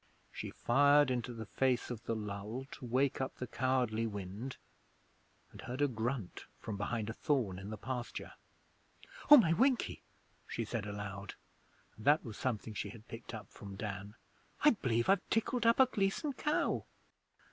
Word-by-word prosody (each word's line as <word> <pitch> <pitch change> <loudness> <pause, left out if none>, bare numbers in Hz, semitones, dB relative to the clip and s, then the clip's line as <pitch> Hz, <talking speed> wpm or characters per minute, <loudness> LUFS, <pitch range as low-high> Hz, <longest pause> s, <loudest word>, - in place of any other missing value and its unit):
She - - -5
fired 145 +2 +4
into 125 -1 -1
the 115 -2 -6
face 125 +3 +1
of 115 -2 -6
the 115 - 0
lull, 105 +4 -4
to - - -8
wake 130 +3 +1
up 130 - -2
the 125 - -4
cowardly 125 -3 +1
wind, 105 +5 -5 0.9
and - - -11
heard 125 +2 -5
a 145 - +4
grunt 115 -4 -3
from 110 - -5
behind 105 +2 -2
a 110 - -3
thorn 115 - 0
in 95 +2 -7
the 110 - -5
pasture. 125 0 -5 1.0
'Oh, 295 - +13
my 170 - +5
Winkie!' 255 +6 +2 0.5
she 115 - -3
said 110 -2 -3
aloud, 100 -1 -5 0.6
and 110 - -11
that 150 +2 +5
was 110 -3 -6
something 115 -3 -2
she 105 0 -3
had 110 +3 -12
picked 115 +1 -8
up 105 -3 -9
from 100 -1 -9
Dan. 100 0 -5 0.5
'I 300 - +8
b'lieve 115 -2 +1
I've 195 -1 +3
tickled 230 +1 +1
up 230 - +5
a 265 - +9
Gleason 225 +5 0
cow.' 300 +4 0
120 Hz, 170 wpm, -34 LUFS, 105-140 Hz, 1.0 s, Oh